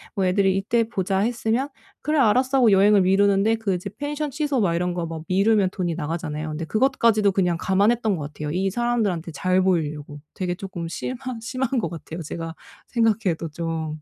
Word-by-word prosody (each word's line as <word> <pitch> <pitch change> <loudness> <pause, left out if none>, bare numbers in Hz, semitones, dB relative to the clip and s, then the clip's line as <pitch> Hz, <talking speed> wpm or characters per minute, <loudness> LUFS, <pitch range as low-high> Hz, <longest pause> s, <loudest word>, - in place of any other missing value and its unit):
뭐 195 -2 +1
애들이 190 +1 +2
"이때 230 +4 +1
보자." 190 -3 -1
했으면 235 +4 0 0.3
"그래 305 +1 0
알았어." 260 +3 +3
하고 240 -5 +5
여행을 200 +1 +5
미루는데 200 +3 +3
그 220 -4 -1
이제 180 +3 -5
펜션 295 0 -3
취소 290 -2 -1
막 180 -6 +2
이런거 175 0 -1
막 165 -1 -6
미루면 200 +1 +3
돈이 175 -3 -2
나가잖아요. 155 -1 -4
근데 155 +2 -4
그것까지도 220 -1 +3
그냥 180 -3 +1
감안했던 205 +3 +2
것 150 -1 -6
같아요. 150 0 -4
이 190 +4 0
사람들한테 205 -7 -1
잘 185 +5 +1
보이려고. 150 -5 -1
되게 180 -2 -2
조금 180 -4 -6
심한 255 +6 -5
심한 255 +2 -2
것 205 - -1
같아요, 165 0 -7
제가 165 +2 -5 0.3
생각해도 220 -8 +1
좀. 160 -1 -4
195 Hz, 405 characters per minute, -23 LUFS, 170-225 Hz, 0.3 s, 하고